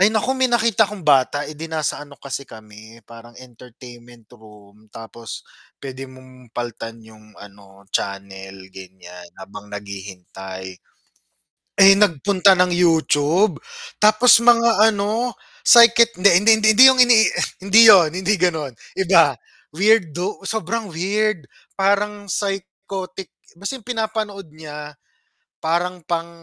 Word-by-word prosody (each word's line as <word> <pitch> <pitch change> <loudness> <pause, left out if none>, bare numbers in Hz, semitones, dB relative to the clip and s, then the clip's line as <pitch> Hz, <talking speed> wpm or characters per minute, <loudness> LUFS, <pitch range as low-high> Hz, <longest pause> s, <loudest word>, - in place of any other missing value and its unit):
ay 195 - +5
nako, 220 +4 -1
may 260 -1 0
nakita 225 -3 +1
kong 205 -5 -10
bata, 145 0 +1
edi 155 +2 -9
nasa 155 -3 -4
ano 145 -1 -15
kasi 140 0 -8
kami 110 +1 -16
parang 115 +1 -16
entertainment 120 -1 -16
room 105 -2 -20
tapos 115 +1 -11 0.3
p'wede 135 -1 -9
mong 130 -1 -18
palitan 115 -1 -7
'yung 110 -1 -20
ano 100 -1 -17
channel 95 -1 -6
gan'yan, 90 -2 -14
habang 100 +2 -12
naghihintay, 95 -2 -10 1.1
eh, 195 0 +8
nagpunta 195 0 +2
ng 180 - +3
YouTube 165 +2 +1 0.5
tapos 225 +2 +5
mga 235 -2 +3
ano, 215 +4 -3 0.3
psychic 235 0 +6
hindi, 200 +2 +5
hindi, 225 - +5
hindi, 215 - +1
hindi 250 - +7
yung 260 - -2
ini 245 -1 +5 0.5
hindi 200 +3 +4
'yun 185 -7 +6
hindi 185 +4 -2
gano'n, 160 -7 -2 0.3
iba 170 -6 +3 0.4
weirdo, 190 -1 0
sobrang 220 +2 -4
weird 195 +2 -2 0.3
parang 205 +1 -1
psychotic, 195 -1 -6 0.3
kasi 265 +7 -6
'yung 230 - -21
pinapanood 220 -6 -5
niya 150 -1 -11 0.7
parang 175 +2 -2
pang 170 -1 -4
160 Hz, 125 wpm, -19 LUFS, -, 1.1 s, eh